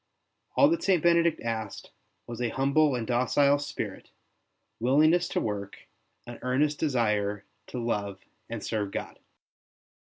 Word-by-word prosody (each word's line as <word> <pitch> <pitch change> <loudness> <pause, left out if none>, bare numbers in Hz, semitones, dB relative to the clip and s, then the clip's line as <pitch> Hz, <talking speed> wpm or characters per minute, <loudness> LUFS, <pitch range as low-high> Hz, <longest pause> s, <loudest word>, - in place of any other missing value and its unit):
All 280 - +6
that 335 0 0
St. 185 -5 +2
Benedict 170 -1 +3
asked 110 -3 -5 0.3
was 120 0 -7
a 120 - 0
humble 140 +3 +2
and 120 -2 -3
docile 140 +4 +3
spirit, 145 - -6 0.7
willingness 150 +8 +4
to - - -1
work, 100 -2 -5 0.4
an 120 -1 -9
earnest 145 +4 +1
desire 105 -8 0 0.2
to - - -7
love 100 -5 -3 0.2
and 115 -2 -5
serve 105 -3 -2
God. - - -6
125 Hz, 130 wpm, -28 LUFS, 110-150 Hz, 0.7 s, All